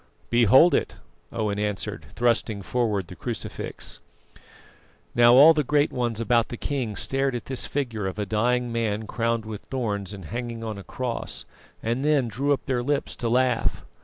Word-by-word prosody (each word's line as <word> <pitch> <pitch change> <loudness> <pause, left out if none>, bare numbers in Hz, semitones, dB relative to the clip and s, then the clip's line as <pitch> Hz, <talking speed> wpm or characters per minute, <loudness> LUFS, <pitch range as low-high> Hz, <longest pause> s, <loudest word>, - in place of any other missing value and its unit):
"Behold 120 - +6
it," - - 0 0.4
Owen 105 -2 -1
answered, 105 -1 -3
thrusting 110 -4 +1
forward 110 -4 0
the 90 - -11
crucifix. 80 - -6 1.1
Now 120 0 +6
all 150 +5 +9
the 150 -1 +1
great 145 +2 +2
ones 120 -3 -1
about 115 -1 +2
the 120 - -6
king 125 -7 -2
stared 135 +2 0
at 120 - -5
this 130 -2 -2
figure 115 -8 -2
of 95 - -5
a 105 - -1
dying 120 +4 +1
man 110 -2 -1
crowned 115 0 -1
with 110 -1 -6
thorns 105 -7 -3
and 100 -4 -8
hanging 115 +2 -5
on 110 -3 -4
a - - -9
cross, 125 +1 -4 0.4
and 120 +4 -1
then 145 -4 +3
drew 135 +7 -1
up 140 - 0
their 130 -3 0
lips 140 +3 -1
to 115 - -2
laugh. 125 0 +1
120 Hz, 170 wpm, -25 LUFS, 105-130 Hz, 1.1 s, all